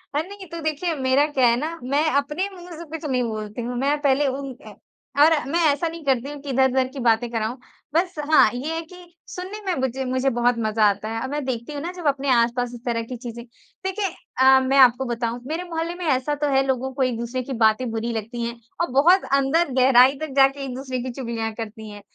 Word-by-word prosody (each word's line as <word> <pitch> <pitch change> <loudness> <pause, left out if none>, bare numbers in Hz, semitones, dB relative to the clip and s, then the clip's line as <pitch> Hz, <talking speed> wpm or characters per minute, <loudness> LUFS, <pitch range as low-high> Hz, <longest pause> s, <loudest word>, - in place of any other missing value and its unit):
अरे, 315 +4 0
नहीं 400 -1 -9
तो 335 0 -6
देखिए 315 +2 -1
मेरा 265 +1 +2
क्या 265 -4 +2
है 235 - +4
ना, 325 +3 -4
मैं 280 +4 +1
अपने 300 +7 -1
मुँह 360 -2 -12
से 340 - -7
कुछ 325 0 -6
नहीं 250 -1 +1
बोलती 215 +1 -5
हूँ, 245 +1 -4
मैं 280 +3 +1
पहले 280 0 +3
उन 275 +1 -3
अ, - - -10 0.5
और 320 - +6 0.2
मैं 340 - +1
ऐसा 335 +4 -1
नहीं 330 -1 -7
करती 265 0 +1
हूँ 290 0 -7
कि 285 - -8
इधर-उधर 265 0 +2
की 275 - -6
बातें 235 0 +2
कराऊँ। 225 +2 -2 0.4
बस 350 +3 +1 0.2
हाँ, 260 - +7
ये 290 +6 -3
है 330 - -2
कि 335 +2 -14 0.3
सुनने 375 +4 -6
में 375 - 0
मुजे 265 +1 -2
मुझे 260 +1 +1
बहुत 240 0 +1
मज़ा 215 0 +1
आता 205 +2 -3
है, 225 0 -3
अब 260 - -4
मैं 295 0 -2
देखती 245 +2 -4
हूँ 285 - -5
ना 345 +3 -4
जब 350 -4 -4
अपने 280 -1 0
आस-पास 240 0 +2
इस 235 - -12
तरह 235 -1 0
की 250 +2 -7
चीज़ें। 235 -1 -8 0.4
देखें 385 +2 -2 0.4
अ, 265 0 +7
मैं 265 +1 +1
आपको 260 0 +6
बताऊँ 235 -1 -2
मेरे 325 +4 -3
मोहल्ले 335 0 -4
में 360 - -6
ऐसा 290 0 +1
तो 295 0 -1
है 270 0 +4
लोगों 265 0 -1
को 265 0 0
एक-दूसरे 240 0 -2
की 265 - -5
बातें 225 +1 +2
बुरी 225 +1 -2
लगती 230 +2 -5
हैं 235 - -4 0.3
और 340 - +1
बहुत 340 +8 +5
अंदर 280 +4 +2
गहराई 255 +1 +6
तक 310 -3 -5
जाके 275 0 +4
एक-दूसरे 260 0 -4
की 255 - -4
चुगलियाँ 235 -3 -4
करती 220 -1 -7
हैं। 205 0 -10
265 Hz, 235 wpm, -23 LUFS, 240-300 Hz, 0.5 s, हाँ